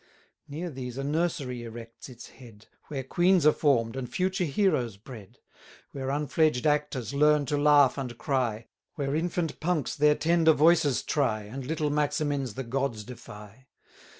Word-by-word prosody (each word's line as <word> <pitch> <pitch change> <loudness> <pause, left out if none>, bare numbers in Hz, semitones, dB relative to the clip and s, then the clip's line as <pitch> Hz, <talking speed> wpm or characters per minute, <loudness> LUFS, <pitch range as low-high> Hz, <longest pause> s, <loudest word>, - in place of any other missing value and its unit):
Near 160 +4 -5
these 125 -2 -7
a 135 - -3
Nursery 145 -5 -2
erects 115 +1 -10
its 120 -2 -12
head, 115 -5 -16 0.2
Where 135 -3 -4
queens 175 +4 +2
are 155 - +8
form'd, 120 -6 +1
and 130 -2 -5
future 185 0 0
heroes 140 - 0
bred; 105 -2 -12 0.5
Where 135 -1 -5
unfledged 150 -1 +1
actors 145 -5 0
learn 150 0 +3
to 145 +1 -1
laugh 145 -2 +5
and 125 -3 -5
cry, 120 -6 -1 0.3
Where 140 -3 -2
infant 170 0 -2
punks 160 -5 -1
their 150 0 +4
tender 165 +1 +3
voices 155 -3 +3
try, 115 -8 0
And 125 +5 -8
little 150 -1 -1
Maximins 145 -4 -1
the 135 - -4
gods 120 -3 -2
defy. 105 +1 -12
140 Hz, 150 wpm, -27 LUFS, 125-150 Hz, 0.5 s, are